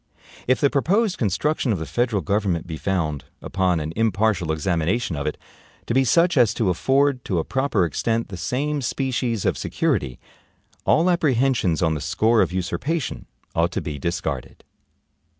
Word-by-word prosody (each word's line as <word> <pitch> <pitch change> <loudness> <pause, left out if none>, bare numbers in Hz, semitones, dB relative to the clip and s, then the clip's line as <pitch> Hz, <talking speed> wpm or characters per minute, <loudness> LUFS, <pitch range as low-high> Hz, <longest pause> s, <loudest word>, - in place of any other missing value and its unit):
If 130 0 +3
the 140 - +3
proposed 195 +8 +1
construction 125 - 0
of 100 - +1
the 80 - -4
federal 120 -3 0
government 100 -5 0
be 85 -3 -5
found, 80 -8 -2
upon 90 -3 0
an 75 +1 -4
impartial 105 -6 +1
examination 85 +5 0
of 70 0 -3
it, 75 - -2 0.5
to - - -2
be 135 +2 +4
such 170 +6 +3
as 115 -4 +4
to 105 -5 +1
afford, 135 - +2
to 95 - -1
a 80 - +1
proper 130 - +1
extent, 115 - -1
the 95 - -6
same 140 +11 -2
species 125 -4 -1
of - - +1
security, 65 -4 -1 0.7
all 165 +3 +4
apprehensions 130 - +2
on 80 -2 +2
the 75 - -3
score 110 +9 +2
of - - +1
usurpation 120 - -3 0.3
ought 85 +1 +2
to - - -1
be 75 -4 -5
discarded. 85 +5 -4
110 Hz, 165 wpm, -23 LUFS, 85-130 Hz, 0.7 s, be